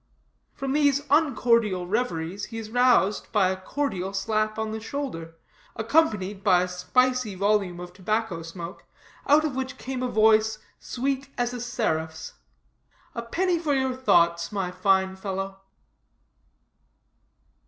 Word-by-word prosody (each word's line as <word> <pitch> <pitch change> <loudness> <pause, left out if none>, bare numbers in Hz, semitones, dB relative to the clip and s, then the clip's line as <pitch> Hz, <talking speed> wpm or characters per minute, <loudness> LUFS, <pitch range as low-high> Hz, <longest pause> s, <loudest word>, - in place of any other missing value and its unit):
From 270 -1 -3
these 285 -1 +3
uncordial 235 - +3
reveries 195 -3 -2
he 225 - -8
is 220 -1 -7
roused 245 -5 +3
by 200 -4 +3
a - - -1
cordial 195 -6 -3
slap 215 +2 0
on 220 0 -2
the 220 - -4
shoulder, 220 - -5 0.4
accompanied 215 -6 +1
by 180 -3 +4
a - - -2
spicy 250 +4 +1
volume 200 -2 +1
of 175 0 -8
tobacco 210 -1 -2
smoke, 170 +2 -8 0.4
out 300 +2 +5
of 290 -4 -2
which 265 +1 -4
came 260 -1 -5
a 255 - 0
voice, 220 -1 +3 0.2
sweet 270 +2 -3
as 245 0 0
a 245 - -5
seraph's: 160 -10 -2 0.8
"A 235 - -4
penny 345 +9 0
for 300 -4 0
your 265 -1 0
thoughts, 170 -9 +2
my 195 -3 -2
fine 190 0 +2
fellow." 195 0 -5
215 Hz, 135 wpm, -26 LUFS, 190-255 Hz, 0.8 s, out